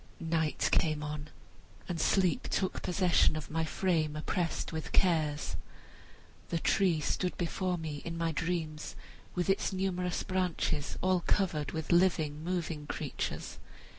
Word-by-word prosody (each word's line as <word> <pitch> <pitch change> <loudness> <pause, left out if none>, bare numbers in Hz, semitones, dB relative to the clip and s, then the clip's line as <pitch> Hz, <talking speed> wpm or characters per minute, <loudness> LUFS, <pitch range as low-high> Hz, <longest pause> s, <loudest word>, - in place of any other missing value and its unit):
Night 160 -2 +2
came 155 -2 +2
on 150 0 -5 0.6
and 170 -3 -2
sleep 190 +7 +2
took 190 - 0
possession 180 -3 +3
of 155 -1 -5
my 165 +1 +1
frame 160 -2 +1
oppressed 165 +2 -1
with 160 -1 -4
cares. 155 -5 +2 0.9
The 170 - +1
tree 175 0 +3
stood 180 +4 -1
before 180 +1 -1
me 155 -3 -4
in 165 0 -4
my 165 0 +1
dreams, 160 -1 -2 0.4
with 180 -1 0
its 195 +1 +2
numerous 185 -2 -1
branches 180 -5 -1
all 185 -1 +4
covered 165 -7 +1
with 160 +1 -3
living, 160 -4 +3
moving 165 -4 -2
creatures. - - -4
165 Hz, 135 wpm, -32 LUFS, 155-180 Hz, 0.9 s, all